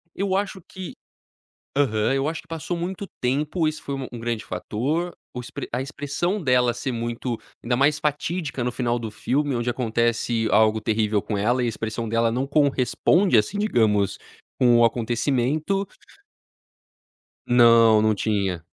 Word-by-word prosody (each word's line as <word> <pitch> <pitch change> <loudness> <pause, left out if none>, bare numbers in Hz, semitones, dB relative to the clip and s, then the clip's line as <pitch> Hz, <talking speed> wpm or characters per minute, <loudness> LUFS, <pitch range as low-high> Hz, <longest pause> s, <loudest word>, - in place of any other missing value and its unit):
Eu 195 0 0
acho 195 -1 -2
que 185 +2 -9 0.8
aham, 110 -5 +2
eu 135 +2 0
acho 160 +1 -4
que - - -28
passou 165 +2 -4
muito 185 +3 -4 0.2
tempo, 150 +6 0
esse 155 0 -4
foi 140 - -5
u 135 -2 -5
um 120 - -6
grande 115 -1 -3
fator. 140 - -2 0.2
O - - -7
ex 120 - -10 0.2
a 125 - -1
expressão 145 +8 -2
dela 125 -3 +3
ser 120 +3 -3
muito 120 0 -3 0.2
ainda 120 +1 0
mais 145 +3 +2
fatídica 150 -2 -2
no 125 - -1
final 120 -1 -1
do 115 -2 -5
filme, 140 +6 -1
onde 120 0 -1
acontece 115 -1 0
algo 110 +1 +4
terrível 105 -2 0
com 105 - -3
ela, 120 +5 +1
e - - +1
a - - 0
expressão 110 0 -4
dela 115 +1 +1
não 130 +3 -1
corresponde 140 - +3
assim, 105 - 0
digamos, 110 - +2 0.4
com 120 -2 +5
o 120 - +6
acontecimento. 130 - 0 1.6
Não, 115 -2 +6
não 110 0 +3
tinha. 100 -5 -1
125 Hz, 160 wpm, -24 LUFS, 115-150 Hz, 1.6 s, o